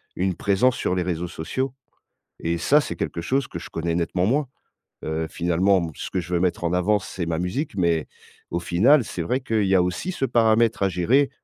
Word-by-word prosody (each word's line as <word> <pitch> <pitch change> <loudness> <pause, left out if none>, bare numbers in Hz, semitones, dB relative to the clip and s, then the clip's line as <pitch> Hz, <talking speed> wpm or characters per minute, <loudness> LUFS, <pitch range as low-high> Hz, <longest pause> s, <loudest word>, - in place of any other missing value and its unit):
une 95 0 0
présence 100 +8 +2
sur 90 - 0
les 90 - 0
réseaux 90 -1 -2
sociaux 125 +12 -3 0.7
et 85 +1 0
ça 140 - +4
c'est - - -3
quelque - - -3
chose 130 +10 0
que - - -6
je - - -10
connais 85 0 -2
nettement 90 +1 0
moins, 140 +7 +1 0.6
heu, 80 +1 -2
finalement 90 0 +1
ce - - -6
que 95 - -1
je 90 +1 -5
veux 85 - +2
mettre 90 -1 0
en 85 +1 +1
avance, 95 +2 +1
c'est 90 - -4
ma 80 -1 -2
musique, 100 - -3
mais 85 -4 +1 0.4
au 85 - -1
final, 105 - +4
c'est 90 - -4
vrai 85 +10 0
qu'il 115 -5 0
y 95 0 +4
a 90 - +4
aussi 90 - -2
ce 175 - -2
paramètre 115 -3 +3
à 100 - +4
gérer 115 +11 +2
90 Hz, 215 wpm, -24 LUFS, 85-115 Hz, 0.7 s, ça